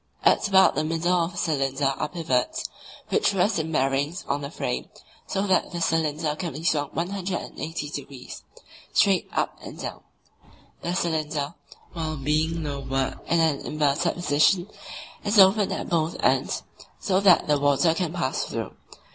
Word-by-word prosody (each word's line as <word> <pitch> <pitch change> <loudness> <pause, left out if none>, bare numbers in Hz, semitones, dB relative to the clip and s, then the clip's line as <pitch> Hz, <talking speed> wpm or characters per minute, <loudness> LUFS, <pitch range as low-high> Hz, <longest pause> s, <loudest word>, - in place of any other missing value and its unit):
At - - +4
about 190 -1 +6
the 155 - 0
middle 165 +3 0
of 170 0 +1
the - - -10
cylinder 135 -4 0
are 150 - -3
pivots, 145 -8 -1 0.4
which 200 - +2
rest 195 +1 +2
in 160 0 -3
bearings 140 +4 0
on 140 +1 -1
the 140 - -5
frame, - - -3 0.4
so 195 -1 -1
that 190 -3 +2
the 175 - -4
cylinder 160 -2 0
can 170 -2 -4
be 155 +4 -7
swung 145 -4 +1
180 175 -4 -3
degrees 135 -3 -8 0.5
(straight - - +3
up - - -2
and - - -9
down). - - -6 0.8
The 175 +1 -2
cylinder, 155 -4 -1 0.4
while 155 -2 -3
being 155 +4 0
lowered 135 -2 -2
in 170 - +2
an 155 -3 +2
inverted 150 +2 0
position, 175 +2 +3 0.6
is 210 +1 +1
open 195 +1 +6
at - - -3
both 165 -1 0
ends, - - +1 0.4
so 190 -1 +1
that 195 -3 +5
the 150 -1 +3
water 145 +3 +3
can 170 -1 -2
pass 170 -6 -1
through. - - -4
160 Hz, 155 wpm, -25 LUFS, 145-175 Hz, 0.8 s, about